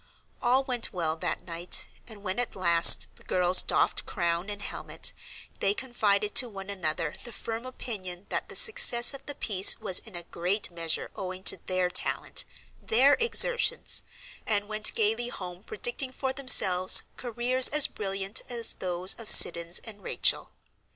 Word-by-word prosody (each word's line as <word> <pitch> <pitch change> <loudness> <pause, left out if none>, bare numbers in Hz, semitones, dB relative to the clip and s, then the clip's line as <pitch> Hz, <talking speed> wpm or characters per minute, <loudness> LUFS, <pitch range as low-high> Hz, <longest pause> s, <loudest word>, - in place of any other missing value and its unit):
All 255 +2 +2
went 250 -3 0
well 165 -5 -3
that - - -5
night, 170 0 +1 0.2
and 215 -3 -13
when 190 +2 -3
at 245 - -2
last 170 -3 +5
the - - -19
girls 180 0 +3
doffed - - 0
crown 170 0 -2
and 205 -1 -5
helmet, - - -4 0.5
they 200 +1 0
confided 210 -5 -1
to 245 -1 +4
one 195 -1 -9
another 160 -4 -3
the 240 - -10
firm 230 +2 -7
opinion 195 -8 -7
that - - -4
the - - -10
success 425 - +3
of 275 - -8
the 290 - -6
piece 195 -3 +3
was 185 - +4
in 220 -5 -12
a 175 - -4
great 180 +4 -2
measure 165 -2 -3
owing 185 0 -7
to - - +4
their 185 -1 0
talent, - - 0 0.4
their 260 +6 +3
exertions, 475 +1 +1 0.5
and 205 -2 -1
went 215 0 -1
gaily 225 +3 0
home 180 -3 -9
predicting 425 - -4
for 265 0 -4
themselves 190 -9 +4
careers 250 +1 +2
as 300 -1 +4
brilliant 195 0 -3
as 235 -2 -1
those 180 0 +1
of 230 - -6
Siddons 170 0 +5
and 210 -3 -12
Rachel. - - 0
205 Hz, 160 wpm, -27 LUFS, 180-245 Hz, 0.5 s, last